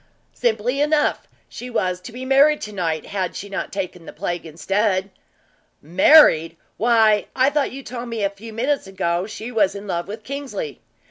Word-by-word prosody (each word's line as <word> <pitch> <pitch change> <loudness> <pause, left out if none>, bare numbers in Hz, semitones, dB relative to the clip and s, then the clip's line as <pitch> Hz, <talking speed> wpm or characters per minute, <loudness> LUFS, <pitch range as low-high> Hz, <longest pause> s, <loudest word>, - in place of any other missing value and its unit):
"Simply 240 +3 0
enough. 300 0 +1 0.2
She 245 +2 -8
was 185 -6 -1
to 235 - -9
be 250 +3 -7
married 280 +3 +5
to 210 - -6
night, 165 -5 -2
had 190 -3 -3
she 200 - -6
not 200 - -4
taken 180 -3 -5
the - - -7
plague 175 -1 -4
instead." 195 +4 0 0.7
"Married? 170 - +5 0.2
Why, 220 -2 +3
I 265 +2 +3
thought 290 -1 0
you 275 +1 -8
told 245 -1 -6
me 225 -3 -3
a 200 - +1
few 215 +3 -11
minutes 255 +2 -1
ago 180 -1 -1
she 220 +2 -7
was 205 -4 +2
in 200 +1 -7
love 175 -3 -3
with 215 +2 -7
Kingsley. 280 - -5
215 Hz, 180 wpm, -21 LUFS, 185-250 Hz, 0.7 s, married